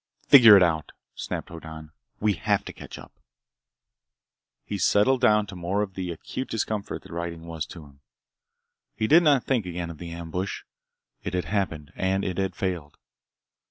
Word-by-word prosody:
"Figure 115 Hz, -7 st, +10 dB
it 95 Hz, -, +6 dB
out," 80 Hz, -4 st, 0 dB, 0.2 s
snapped -, -, -5 dB
Hoddan. 80 Hz, -2 st, -10 dB, 0.3 s
"We 105 Hz, -1 st, +2 dB
have 85 Hz, -, 0 dB
to -, -, -7 dB
catch -, -, -10 dB
up!" -, -, -12 dB, 1.5 s
He -, -, -4 dB
settled 125 Hz, +6 st, +3 dB
down 105 Hz, -1 st, +4 dB
to 100 Hz, -, -10 dB
more 90 Hz, +4 st, -1 dB
of 95 Hz, -2 st, -6 dB
the 90 Hz, -1 st, -4 dB
acute 130 Hz, +10 st, -6 dB
discomfort 110 Hz, -2 st, -3 dB
that -, -, -14 dB
riding 85 Hz, -1 st, -5 dB
was 80 Hz, -2 st, -5 dB
to 85 Hz, -4 st, -11 dB
him. 70 Hz, -1 st, -19 dB, 1.0 s
He 110 Hz, -, -1 dB
did 160 Hz, +9 st, +6 dB
not 145 Hz, -6 st, +4 dB
think 120 Hz, -8 st, 0 dB
again 85 Hz, -1 st, -4 dB
of 80 Hz, -, -12 dB
the 85 Hz, -, -7 dB
ambush. 85 Hz, +3 st, -5 dB, 0.6 s
It -, -, -4 dB
had 90 Hz, -, -1 dB
happened, 85 Hz, -8 st, -2 dB
and 95 Hz, +1 st, 0 dB
it 95 Hz, 0 st, -2 dB
had 95 Hz, -2 st, -1 dB
failed. 85 Hz, -6 st, -4 dB
90 Hz, 170 wpm, -26 LUFS, 85-105 Hz, 1.5 s, Figure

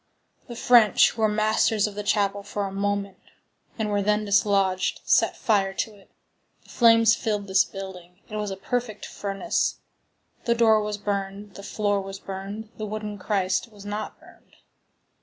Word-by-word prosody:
The 240 Hz, -, -8 dB
French, 235 Hz, -4 st, +5 dB
who 225 Hz, -, -7 dB
were 220 Hz, -, +5 dB
masters 215 Hz, 0 st, +2 dB
of 210 Hz, -, -4 dB
the 210 Hz, -, -4 dB
chapel 205 Hz, -1 st, +1 dB
for 205 Hz, 0 st, -4 dB
a 195 Hz, -, -5 dB
moment, 200 Hz, 0 st, -2 dB, 0.6 s
and 215 Hz, -2 st, -1 dB
were 205 Hz, 0 st, +1 dB
then 210 Hz, +1 st, +1 dB
dislodged, 200 Hz, -2 st, +2 dB
set -, -, +3 dB
fire 195 Hz, -3 st, +1 dB
to 220 Hz, -, -2 dB
it. 200 Hz, -, -21 dB, 0.5 s
The -, -, -23 dB
flames 230 Hz, -2 st, +5 dB
filled 210 Hz, -4 st, -2 dB
this 190 Hz, -1 st, +4 dB
building; 185 Hz, -2 st, -9 dB
it 215 Hz, -, -8 dB
was 210 Hz, -1 st, -2 dB
a 195 Hz, -, -5 dB
perfect 225 Hz, +1 st, -3 dB
furnace; 200 Hz, +10 st, -2 dB, 0.7 s
the 235 Hz, -, +2 dB
door 220 Hz, -2 st, +4 dB
was 210 Hz, 0 st, -3 dB
burned, 200 Hz, 0 st, -4 dB
the 200 Hz, -, -10 dB
floor 205 Hz, 0 st, -1 dB
was 195 Hz, 0 st, -7 dB
burned, 195 Hz, +3 st, -7 dB
the 215 Hz, -, -4 dB
wooden 210 Hz, -1 st, -5 dB
Christ 195 Hz, +3 st, -1 dB
was 205 Hz, -1 st, -14 dB
not 210 Hz, +1 st, -5 dB
burned. -, -, -20 dB
205 Hz, 170 wpm, -25 LUFS, 195-215 Hz, 0.7 s, French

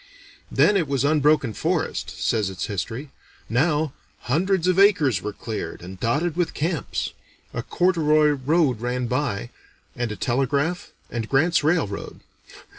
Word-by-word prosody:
"Then 205 Hz, -, +4 dB
it 170 Hz, -5 st, 0 dB
was 140 Hz, -1 st, 0 dB
unbroken 150 Hz, -5 st, +3 dB
forest," -, -, -1 dB
says 110 Hz, -4 st, +1 dB
its 95 Hz, -1 st, -4 dB
history; 115 Hz, +8 st, -4 dB, 0.4 s
"now, 150 Hz, +3 st, +1 dB, 0.3 s
hundreds 180 Hz, +6 st, +1 dB
of 185 Hz, +1 st, +3 dB
acres 150 Hz, -, +4 dB
were 105 Hz, -, -3 dB
cleared, 110 Hz, -3 st, -6 dB
and 95 Hz, +1 st, -9 dB
dotted 145 Hz, -, 0 dB
with 175 Hz, -1 st, -1 dB
camps. 160 Hz, -3 st, -2 dB, 0.4 s
A -, -, -2 dB
corduroy 155 Hz, -4 st, +3 dB
road 145 Hz, -3 st, +1 dB
ran 125 Hz, +1 st, -1 dB
by, 120 Hz, -3 st, -2 dB, 0.4 s
and 120 Hz, -2 st, -2 dB
a -, -, -4 dB
telegraph, 140 Hz, -, 0 dB, 0.2 s
and 115 Hz, -2 st, -3 dB
Grant's 155 Hz, +4 st, +3 dB
railroad. 150 Hz, -, -1 dB
140 Hz, 135 wpm, -24 LUFS, 120-160 Hz, 0.4 s, Then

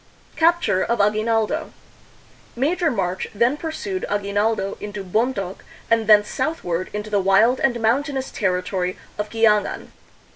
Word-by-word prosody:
Capture 330 Hz, -, +2 dB
of 235 Hz, -1 st, -1 dB
A 205 Hz, +1 st, +4 dB
Q 215 Hz, 0 st, -2 dB
uina.ldo 230 Hz, +8 st, -1 dB, 0.8 s
Major 325 Hz, +7 st, +1 dB
March 185 Hz, -8 st, -2 dB
then 235 Hz, +6 st, +3 dB
pursued 335 Hz, +5 st, -4 dB
Aguinaldo 205 Hz, 0 st, 0 dB
into 205 Hz, -1 st, -6 dB
Bontok 195 Hz, -1 st, -2 dB, 0.3 s
and 225 Hz, -2 st, +2 dB
thence 210 Hz, -1 st, +6 dB
southward 185 Hz, -, -2 dB
into 210 Hz, +1 st, -5 dB
the 205 Hz, -, +2 dB
wild 195 Hz, +6 st, +4 dB
and 240 Hz, -3 st, +1 dB
mountainous 265 Hz, +4 st, 0 dB
terri 180 Hz, -3 st, -1 dB
tory 185 Hz, -1 st, -2 dB, 0.2 s
of 210 Hz, 0 st, -2 dB
Quiangan. 215 Hz, -2 st, +1 dB
220 Hz, 140 wpm, -22 LUFS, 200-260 Hz, 0.8 s, thence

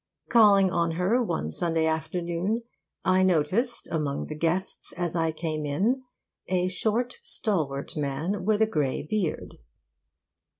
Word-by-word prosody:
Calling 200 Hz, -5 st, +6 dB
on 170 Hz, -2 st, +1 dB
her 185 Hz, +9 st, +2 dB
one 80 Hz, -, -2 dB
Sunday 165 Hz, -, 0 dB
afternoon, 170 Hz, +7 st, -1 dB, 0.4 s
I 185 Hz, 0 st, +4 dB
noticed 185 Hz, -, +1 dB
among 150 Hz, -4 st, -1 dB
the 155 Hz, -, -6 dB
guests, 170 Hz, +5 st, -2 dB
as 175 Hz, -2 st, -3 dB
I 165 Hz, -1 st, +1 dB
came 155 Hz, -1 st, -3 dB
in, 200 Hz, -, +1 dB, 0.5 s
a 185 Hz, -1 st, +1 dB
short, 230 Hz, +6 st, -1 dB
stalwart 155 Hz, -, -2 dB
man 155 Hz, +7 st, -2 dB
with 215 Hz, +2 st, +3 dB
a -, -, +5 dB
grey 150 Hz, -11 st, -1 dB
beard. 180 Hz, 0 st, -3 dB
175 Hz, 130 wpm, -27 LUFS, 155-205 Hz, 0.5 s, Calling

